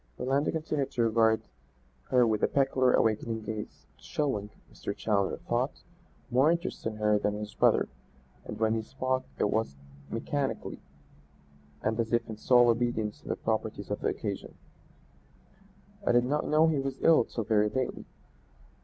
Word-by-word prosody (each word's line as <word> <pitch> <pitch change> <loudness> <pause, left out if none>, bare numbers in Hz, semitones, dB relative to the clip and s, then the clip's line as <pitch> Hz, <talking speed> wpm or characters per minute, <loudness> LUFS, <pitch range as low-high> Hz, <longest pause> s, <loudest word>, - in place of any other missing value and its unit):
Orlando 135 +3 +1
continued 155 -4 -1
to 120 - +1
regard 110 -1 +3 0.7
her 125 -1 +5
with 110 -2 +1
a - - +4
peculiar 135 -2 +2
awakening 110 0 +1
gaze, 105 -1 -6
showing, 105 - -2 0.2
Mr. 100 - -5
Challoner 100 -3 0
thought, - - -2 0.5
more 130 +5 +4
interest 170 -8 -1
in 110 - -3
her 105 -1 +2
than 105 0 0
in 105 - -5
his 105 -1 -6
brother, - - +3 0.6
and - - -7
when 110 0 +2
he 115 - 0
spoke 130 +2 -2
it 105 - +1
was 110 -10 -1 0.3
mechanically 135 +4 -3 1.0
and 110 +2 0
as 115 0 -1
if 115 -1 +2
in 110 - -6
sole 120 +1 +5
obedience 115 -2 0
to - - -16
the - - -1
proprieties - - -3
of - - -1
the - - 0
occasion. - - -4 1.5
"I - - +2
did 120 0 +4
not 150 +4 0
know 155 +1 +5
he 155 -3 +1
was 135 0 -3
ill 165 -7 +6
till 115 - -4
very 105 -1 +2
lately. 130 +2 -3
115 Hz, 160 wpm, -29 LUFS, 110-135 Hz, 1.5 s, ill